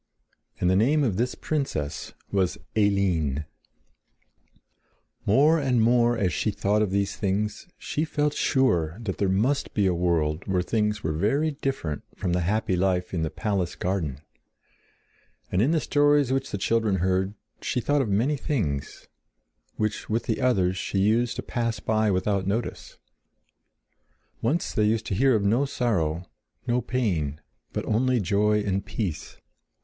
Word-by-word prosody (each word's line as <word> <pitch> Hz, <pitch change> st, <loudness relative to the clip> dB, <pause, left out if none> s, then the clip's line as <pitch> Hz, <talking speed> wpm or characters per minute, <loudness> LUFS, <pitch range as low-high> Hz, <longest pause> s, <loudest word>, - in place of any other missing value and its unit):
And 90 Hz, -, +1 dB
the 95 Hz, -, +4 dB
name 140 Hz, +9 st, +3 dB
of 105 Hz, -8 st, 0 dB
this 125 Hz, +3 st, 0 dB
princess 80 Hz, -, -3 dB, 0.2 s
was 95 Hz, -3 st, +1 dB, 0.2 s
Eline. 90 Hz, -9 st, +1 dB, 1.8 s
More 150 Hz, +10 st, +5 dB
and 130 Hz, -4 st, +1 dB
more 120 Hz, +1 st, +3 dB
as 95 Hz, -4 st, 0 dB
she -, -, 0 dB
thought 105 Hz, +1 st, +1 dB
of 105 Hz, -, +1 dB
these 100 Hz, +1 st, 0 dB
things 105 Hz, -, -2 dB
she 150 Hz, -, -2 dB
felt 150 Hz, -2 st, 0 dB
sure 90 Hz, -, +1 dB
that 110 Hz, -5 st, -4 dB
there 100 Hz, -, +2 dB
must 120 Hz, +10 st, 0 dB
be 105 Hz, -, +2 dB
a 95 Hz, -, +3 dB
world 85 Hz, -2 st, 0 dB
where 95 Hz, -2 st, +1 dB
things 105 Hz, +1 st, 0 dB
were 80 Hz, -, 0 dB
very 135 Hz, -, +1 dB
different 135 Hz, -, -3 dB
from 90 Hz, -, -2 dB
the 90 Hz, -, +2 dB
happy 105 Hz, +2 st, 0 dB
life 90 Hz, 0 st, 0 dB
in 85 Hz, -, -1 dB
the 80 Hz, -, 0 dB
palace 95 Hz, -4 st, -2 dB
garden; 80 Hz, -7 st, -2 dB, 1.3 s
and 90 Hz, -, +2 dB
in 125 Hz, -, +3 dB
the 165 Hz, 0 st, +3 dB
stories 145 Hz, -2 st, +3 dB
which 135 Hz, 0 st, -1 dB
the -, -, -3 dB
children 110 Hz, 0 st, +1 dB
heard 95 Hz, +2 st, 0 dB, 0.3 s
she -, -, -1 dB
thought 145 Hz, +4 st, +1 dB
of 120 Hz, -, -2 dB
many 120 Hz, +9 st, +1 dB
things, 90 Hz, -, -3 dB, 0.7 s
which, 110 Hz, -1 st, -2 dB
with 115 Hz, +2 st, 0 dB
the -, -, -2 dB
others, 95 Hz, -8 st, +2 dB
she 100 Hz, -, -3 dB
used 115 Hz, +5 st, +2 dB
to -, -, -4 dB
pass 115 Hz, -1 st, -2 dB
by 110 Hz, -1 st, +1 dB
without 95 Hz, 0 st, 0 dB
notice. 110 Hz, +4 st, -3 dB, 1.4 s
Once 150 Hz, +10 st, 0 dB
they 105 Hz, -, +2 dB
used 110 Hz, +1 st, +1 dB
to -, -, -3 dB
hear 130 Hz, +5 st, +4 dB
of 105 Hz, -, +1 dB
no 115 Hz, +7 st, +3 dB
sorrow, 95 Hz, -, -1 dB, 0.4 s
no 125 Hz, 0 st, +1 dB
pain, 90 Hz, -, -1 dB, 0.3 s
but -, -, -3 dB
only 125 Hz, +3 st, +2 dB
joy 105 Hz, +2 st, +2 dB
and 100 Hz, -1 st, -1 dB
peace. 105 Hz, -7 st, -4 dB
105 Hz, 155 wpm, -26 LUFS, 95-125 Hz, 1.8 s, More